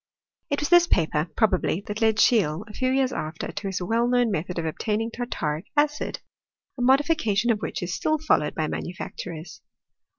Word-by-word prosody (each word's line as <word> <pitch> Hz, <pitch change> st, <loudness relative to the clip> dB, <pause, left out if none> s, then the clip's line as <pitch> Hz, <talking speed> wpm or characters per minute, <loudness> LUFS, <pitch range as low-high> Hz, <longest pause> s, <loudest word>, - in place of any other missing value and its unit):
It 285 Hz, -, 0 dB
was 295 Hz, -, -1 dB
this 350 Hz, 0 st, +6 dB
paper, 160 Hz, -, +1 dB
probably, 190 Hz, -4 st, +1 dB
that 210 Hz, +2 st, -5 dB
led 220 Hz, -1 st, +4 dB
Scheele, 205 Hz, -6 st, +3 dB
a 210 Hz, -, -11 dB
few 255 Hz, +2 st, 0 dB
years 265 Hz, 0 st, +1 dB
after, 155 Hz, +1 st, -4 dB
to 205 Hz, 0 st, -5 dB
his 190 Hz, -1 st, -3 dB
well 230 Hz, +6 st, +1 dB
known 245 Hz, -2 st, +2 dB
method 180 Hz, -1 st, -3 dB
of 170 Hz, -, -2 dB
obtaining 215 Hz, +8 st, -2 dB
tartaric 170 Hz, -10 st, -3 dB
acid, 295 Hz, 0 st, 0 dB, 0.5 s
a 250 Hz, -, -6 dB
modification 250 Hz, -4 st, +3 dB
of 215 Hz, -, 0 dB
which 195 Hz, -, -4 dB
is 175 Hz, 0 st, -3 dB
still 310 Hz, -, +1 dB
followed 290 Hz, -, +1 dB
by. 160 Hz, -, 0 dB
manufacturers. 170 Hz, -1 st, -6 dB
215 Hz, 175 wpm, -25 LUFS, 175-250 Hz, 0.5 s, this